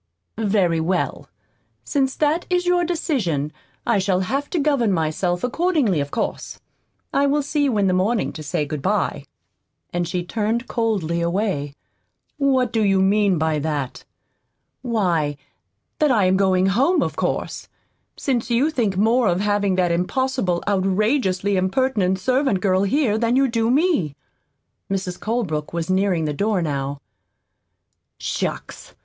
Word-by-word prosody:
"Very 195 Hz, -6 st, +2 dB
well. 175 Hz, +3 st, -1 dB, 0.5 s
Since 270 Hz, -2 st, 0 dB
that 310 Hz, +3 st, 0 dB
is 360 Hz, 0 st, +1 dB
your 355 Hz, 0 st, +3 dB
decision 225 Hz, -, -1 dB, 0.3 s
I 230 Hz, -4 st, +2 dB
shall 190 Hz, -1 st, +1 dB
have 275 Hz, +9 st, -2 dB
to 355 Hz, -, -2 dB
govern 280 Hz, -8 st, +2 dB
myself 175 Hz, +1 st, -1 dB
accordingly, 280 Hz, -, +1 dB
of 140 Hz, 0 st, -2 dB
course. -, -, -4 dB, 0.5 s
I 280 Hz, +1 st, +3 dB
will 290 Hz, +1 st, +1 dB
see 290 Hz, +1 st, 0 dB
you 250 Hz, -6 st, +1 dB
in 200 Hz, -, +2 dB
the 185 Hz, -, +2 dB
morning 200 Hz, +5 st, 0 dB
to 155 Hz, -, -8 dB
say 150 Hz, 0 st, -2 dB
good 150 Hz, -1 st, -5 dB
bye." -, -, -1 dB, 0.7 s
And 175 Hz, -1 st, -1 dB
she 180 Hz, 0 st, -2 dB
turned 225 Hz, +5 st, -1 dB
coldly 195 Hz, -8 st, -1 dB
away. 170 Hz, -5 st, -1 dB, 0.6 s
"What 260 Hz, -4 st, +2 dB
do 225 Hz, -2 st, +2 dB
you 195 Hz, -2 st, +3 dB
mean 195 Hz, -1 st, +3 dB
by 155 Hz, -1 st, 0 dB
that?" 145 Hz, -3 st, -3 dB, 0.8 s
"Why, 175 Hz, -, 0 dB, 0.6 s
that 300 Hz, -, +3 dB
I 220 Hz, -7 st, +3 dB
am 185 Hz, +1 st, +3 dB
going 190 Hz, -1 st, +3 dB
home, 260 Hz, -, +3 dB
of -, -, -3 dB
course -, -, -3 dB, 0.5 s
since 245 Hz, -4 st, -1 dB
you 250 Hz, +7 st, +2 dB
think 220 Hz, -10 st, 0 dB
more 230 Hz, +3 st, +3 dB
of 175 Hz, 0 st, +1 dB
having 205 Hz, -2 st, +1 dB
that 180 Hz, -2 st, +2 dB
impossible, 185 Hz, +1 st, 0 dB
outrageously 200 Hz, 0 st, +1 dB
impertinent 190 Hz, -1 st, +1 dB
servant 255 Hz, 0 st, +1 dB
girl 185 Hz, 0 st, +2 dB
here 215 Hz, +1 st, +1 dB
than 235 Hz, +1 st, +1 dB
you 270 Hz, +1 st, +4 dB
do 230 Hz, -2 st, 0 dB
me." 265 Hz, -, +2 dB, 0.7 s
Mrs. 190 Hz, -2 st, -3 dB
Colebrook 190 Hz, -11 st, -2 dB
was 170 Hz, +1 st, -2 dB
nearing 185 Hz, -4 st, +1 dB
the 150 Hz, -, -1 dB
door 205 Hz, +5 st, 0 dB
how. 140 Hz, -2 st, -3 dB, 1.2 s
"Shucks! -, -, -4 dB
200 Hz, 145 wpm, -22 LUFS, 180-255 Hz, 1.2 s, you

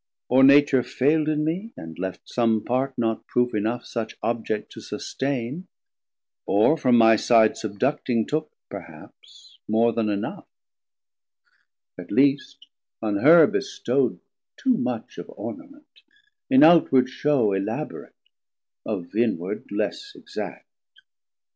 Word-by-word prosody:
Or 130 Hz, +2 st, +5 dB
Nature 140 Hz, -1 st, +6 dB
faild 145 Hz, +5 st, 0 dB
in 150 Hz, 0 st, 0 dB
mee, 190 Hz, +9 st, -3 dB
and 80 Hz, +1 st, -10 dB
left 95 Hz, 0 st, -6 dB
some 115 Hz, -3 st, 0 dB
part 130 Hz, +2 st, -1 dB
Not 115 Hz, -1 st, -2 dB
proof 125 Hz, 0 st, 0 dB
enough 110 Hz, +3 st, -2 dB
such 115 Hz, -2 st, -5 dB
Object 110 Hz, -2 st, -3 dB
to -, -, -11 dB
sustain, 135 Hz, +6 st, -4 dB, 0.8 s
Or 105 Hz, +10 st, +3 dB
from 125 Hz, -6 st, +3 dB
my 115 Hz, -1 st, +6 dB
side 110 Hz, 0 st, +4 dB
subducting, 115 Hz, +2 st, -2 dB
took 155 Hz, +1 st, -3 dB, 0.2 s
perhaps -, -, -13 dB
More 115 Hz, +2 st, +2 dB
then 110 Hz, -2 st, -1 dB
enough; 100 Hz, -1 st, -4 dB, 1.5 s
at 90 Hz, -, -9 dB
least 140 Hz, +1 st, +1 dB, 0.3 s
on 105 Hz, -2 st, -1 dB
her 160 Hz, +9 st, +7 dB
bestow'd 405 Hz, +1 st, -1 dB, 0.4 s
Too 260 Hz, -2 st, +1 dB
much 250 Hz, +2 st, -4 dB
of -, -, -9 dB
Ornament, 290 Hz, +1 st, -10 dB, 0.5 s
in 265 Hz, +1 st, +6 dB
outward 135 Hz, -, +5 dB
shew 130 Hz, -6 st, +1 dB
Elaborate, 95 Hz, 0 st, -5 dB, 0.7 s
of 95 Hz, -4 st, -5 dB
inward 105 Hz, -4 st, -2 dB
less 110 Hz, -, -3 dB
exact. -, -, -8 dB
125 Hz, 120 wpm, -24 LUFS, 110-150 Hz, 1.5 s, her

